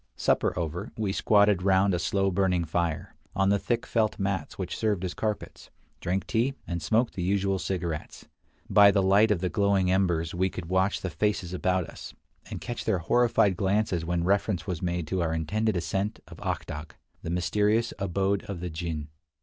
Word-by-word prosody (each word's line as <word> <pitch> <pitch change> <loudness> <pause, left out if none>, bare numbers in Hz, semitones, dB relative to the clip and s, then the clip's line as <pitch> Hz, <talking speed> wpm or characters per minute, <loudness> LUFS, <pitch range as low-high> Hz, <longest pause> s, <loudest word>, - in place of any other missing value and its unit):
Supper - - +1
over, 85 0 -3
we 105 -3 -1
squatted 105 -2 +4
round 95 +1 +3
a 90 - 0
slow 95 +2 +1
burning 90 -2 +1
fire, 80 0 -2 0.2
on 95 0 +2
the 100 0 +3
thick 120 +3 -1
felt 110 -2 0
mats 95 -5 -2
which - - -4
served 105 -4 0
as 90 - -3
carpets, 105 +3 -4 0.3
drank 95 +3 -1
tea, 125 +4 0
and 85 -1 -3
smoked 110 +9 +1
the 90 - -4
usual 95 +1 +1
cigarettes. 85 -5 -4 0.4
By 100 -1 +7
the 100 -1 +2
light 100 +4 +5
of 100 -5 +1
the 90 - 0
glowing 100 -2 +2
embers 85 -4 +1
we 95 +2 +1
could 90 - -7
watch 95 +3 +1
the 95 - -3
faces 100 -2 -1
about 90 0 0
us, - - -10 0.3
and - - -5
catch 120 -1 -5
their 110 -4 +1
horrified 105 +1 +3
glances 100 -3 0
when 85 0 -1
reference 95 -2 +1
was 90 -3 -4
made 85 -2 -1
to 90 +4 -1
our 80 -1 0
intended 105 +6 0
ascent 95 +4 -2
of - - -12
Ak - - -2
Dagh, 75 +1 -7 0.3
the - - -6
mysterious 105 +6 +1
abode 100 +1 0
of 100 -4 -5
the 90 0 -5
jinn. 80 -2 -4
95 Hz, 190 wpm, -27 LUFS, 85-100 Hz, 0.4 s, By